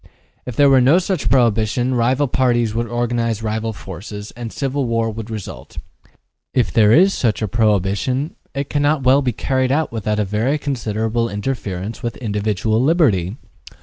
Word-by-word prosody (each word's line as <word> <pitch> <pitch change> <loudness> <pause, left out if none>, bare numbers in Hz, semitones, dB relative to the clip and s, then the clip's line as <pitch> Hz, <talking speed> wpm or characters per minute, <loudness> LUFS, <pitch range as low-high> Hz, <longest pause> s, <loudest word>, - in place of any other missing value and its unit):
If 125 - -5
there 145 +2 +5
were 135 -2 +5
no 135 +7 +5
such 185 -3 -1
prohibition, 120 0 +2
rival 125 +4 +2
parties 120 -3 +1
would 115 +1 -1
organize 120 -1 -1
rival 110 +1 -2
forces, 105 +1 -8
and 120 -1 -7
civil 140 0 -2
war 115 -1 0
would 110 +1 -7
result. 105 - -8 0.3
Yet, - - -29 0.4
if 125 - +1
there 105 -2 +5
is 190 +9 +5
such 110 -3 0
a - - 0
prohibition, 110 - 0 0.2
it 140 0 -2
cannot 145 0 +1
well 130 +2 +5
be 130 -3 0
carried 130 +1 -1
out 155 +2 0
without 105 -2 -2
a 105 - +1
very 110 +9 0
considerable 115 -4 -2
interference 105 -2 -4
with 120 -1 -4
individual 110 0 -1
liberty. 125 - +2
115 Hz, 165 wpm, -19 LUFS, 110-130 Hz, 0.4 s, there